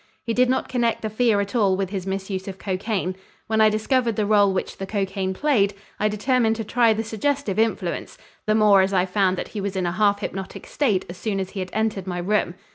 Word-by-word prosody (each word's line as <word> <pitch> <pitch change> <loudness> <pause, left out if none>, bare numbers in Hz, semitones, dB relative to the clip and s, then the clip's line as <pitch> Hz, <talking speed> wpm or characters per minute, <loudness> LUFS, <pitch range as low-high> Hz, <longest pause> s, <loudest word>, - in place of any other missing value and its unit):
He 230 - -2
did 250 +1 +3
not 260 - 0
connect 235 -3 0
the 220 - -2
fear 220 -1 +2
at 200 0 -5
all 195 -5 +3
with 195 -1 -2
his 195 -2 -4
misuse 190 0 -3
of 190 -1 -6
cocaine. 190 -1 -2 0.3
When 220 0 +1
I 215 - +7
discovered 230 +2 +1
the 215 - 0
rôle 205 -1 +4
which 190 - -3
the 195 - -5
cocaine 195 -2 -2
played, 205 -3 +1 0.2
I 210 - +2
determined 225 +2 +1
to 225 - -4
try 230 +1 +3
the 220 +1 0
suggestive 225 0 -1
influence, 225 0 -1 0.3
the 215 - +3
more 210 -3 +6
as 190 +1 0
I 185 -1 +3
found 190 -1 +1
that - - -4
he 210 - -5
was 200 0 -3
in 185 -1 0
a 175 - 0
half 200 +2 +2
hypnotic 190 -2 -6
state 215 -10 0
as 175 - -9
soon 200 +1 -2
as 190 -1 -4
he 200 - -6
had 185 -1 -4
entered 215 -4 -1
my 180 -1 -3
room. 180 -1 0
205 Hz, 235 wpm, -23 LUFS, 190-220 Hz, 0.3 s, I